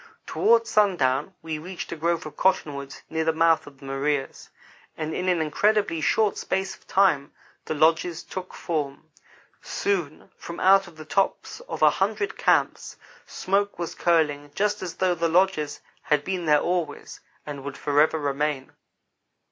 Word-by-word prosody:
Toward 230 0 +3
sundown 180 -7 +1
we 160 -1 -4
reached 180 +3 -7
a - - -3
grove 170 +1 -1
of 155 - -8
cottonwoods 145 -7 -1
near 160 0 -1
the 160 - +2
mouth 165 0 +3
of 140 -2 -13
the 135 - -14
Maria's, 135 +1 -2 0.5
and 155 0 -3
in 185 0 -1
an 175 -2 +2
incredibly 200 +2 +1
short 215 +5 +2
space 190 0 -2
of - - -26
time 170 -8 +2 0.3
the - - -3
lodges 165 +2 +2
took 185 -1 -7
form. 155 -2 -4 0.5
Soon, 175 -7 -2
from 170 - -8
out 195 +1 +5
the 155 0 -10
tops 195 - -1
of - - -2
a - - +7
hundred 405 -1 -1
camps, - - +1 0.3
smoke 200 +2 -1
was 170 -1 -4
curling 150 -4 +1
just 210 0 0
as 180 -3 -5
though 185 -1 +2
the 170 -1 0
lodges 170 -4 +1 0.2
had 150 -1 +1
been 185 0 -3
there 150 -1 +4
always, 170 -4 -3 0.3
and 145 -2 -7
would 140 0 -6
forever 150 +2 +2
remain. 145 -1 -2
160 Hz, 155 wpm, -25 LUFS, 150-185 Hz, 0.5 s, a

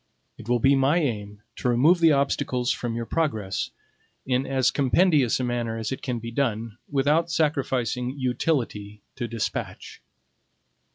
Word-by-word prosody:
It 115 - -11
will 125 - +3
be 135 +4 +4
my 135 +4 +3
aim 105 -9 -3
to 125 - -1
remove 145 +9 +4
the 165 -1 +6
obstacles 140 -3 +1
from 120 -2 -3
your 115 0 -3
progress 110 -11 -1 0.6
in 130 +1 0
as 130 -2 +2
compendious 140 -2 +3
a - - -1
manner 120 -2 -2
as 110 +1 -3
it 130 - -4
can 125 -3 -2
be 115 0 -6
done, 115 -3 -2
without 150 +4 +2
sacrificing 135 -5 -1
utility 120 -6 -2
to 120 -3 -3
despatch. 115 -2 -5
125 Hz, 150 wpm, -25 LUFS, 115-140 Hz, 0.6 s, the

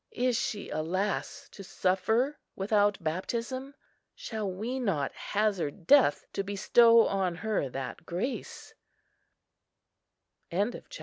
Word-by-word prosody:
Is 250 0 0
she, 210 -2 -3
alas! 185 +6 -2
to 200 - -10
suffer 220 +10 0 0.2
without 205 +1 +2
baptism? 235 - -3 0.4
Shall 215 -3 -4
we 225 +8 -3
not 170 - 0
hazard 200 -5 -1
death 270 - +5
to - - -1
bestow 230 +4 +5
on 190 -3 0
her 205 -7 -1
that 130 +3 -6
grace?" 185 +11 -5
205 Hz, 100 wpm, -29 LUFS, 185-230 Hz, 0.4 s, death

